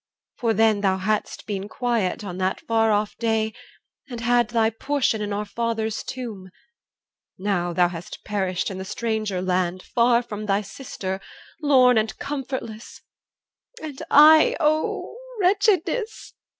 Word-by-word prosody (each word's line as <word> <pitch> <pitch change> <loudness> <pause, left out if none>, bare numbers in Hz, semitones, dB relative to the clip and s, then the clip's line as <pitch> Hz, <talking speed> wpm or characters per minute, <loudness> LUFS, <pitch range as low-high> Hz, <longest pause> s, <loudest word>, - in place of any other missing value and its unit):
For 230 -2 +1
then 220 -1 +3
Thou 190 -2 +2
hadst 210 +3 -2
been 200 -1 -4
quiet 235 -7 -1
on 185 -2 -6
that 185 0 -1
far 225 -1 +2
off 210 0 0
day, 220 -1 0 0.6
And 240 -2 -6
had 240 0 +2
thy 225 -1 +2
portion 240 -1 0
in 205 0 -3
our 205 +1 -2
father's 225 -1 -2
tomb 220 -8 -7 0.9
Now 185 -3 -1
thou 175 +1 +3
hast 170 -1 -9
perished 190 -3 -1
in 190 - -6
the - - -4
stranger 215 -2 -2
land 185 0 0
Far 235 0 +2
from 215 -2 -6
thy 200 0 +2
sister, 195 -3 -6 0.4
lorn 255 -5 +5
and 220 0 -3
comfortless 260 -6 -6 0.8
And 295 -4 -7
I, 310 +2 +7
O 310 +6 0 0.2
wretchedness! 405 +3 +1
220 Hz, 135 wpm, -23 LUFS, 195-245 Hz, 0.9 s, I